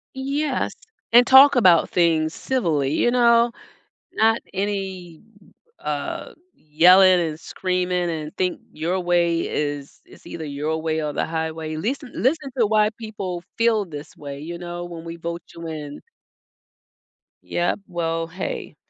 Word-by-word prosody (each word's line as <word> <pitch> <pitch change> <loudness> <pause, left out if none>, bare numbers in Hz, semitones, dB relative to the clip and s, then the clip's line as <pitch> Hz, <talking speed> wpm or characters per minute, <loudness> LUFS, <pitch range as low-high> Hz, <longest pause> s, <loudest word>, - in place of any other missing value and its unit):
Yes, 275 +1 -1 0.4
and 240 +2 +7
talk 275 +2 +8
about 180 -9 +5
things 160 -2 +2
civilly, 160 - -1
you 240 +10 +2
know, 235 -1 +4 0.6
not 225 +1 +3
any, 190 -4 -4 0.6
uh, - - -4 0.2
yelling 180 +4 +5
and 160 -2 -2
screaming 180 0 -1
and 155 -2 -5
think 180 -1 -1
your 170 +4 -2
way 175 -1 +1
is 145 -1 -4
is - - -18
either 160 - -7
your 150 +2 -3
way 160 -1 -1
or 150 - -3
the - - -1
highway. 160 -1 -4
Listen 250 - -3
listen 285 +2 0
to 235 - +4
why 215 0 +3
people 195 -6 -5 0.2
feel 225 -3 +3
this 150 -4 -10
way, 140 -1 -8
you 170 +4 -6
know, 175 0 -6
when 170 -2 -8
we 165 0 -7
vote 170 +1 -5
you 165 -1 -7
in. 150 -2 -7 1.4
Yup, 175 +3 -1
well 165 -2 -2
hey, 185 +3 -5
175 Hz, 140 wpm, -22 LUFS, 160-210 Hz, 1.4 s, talk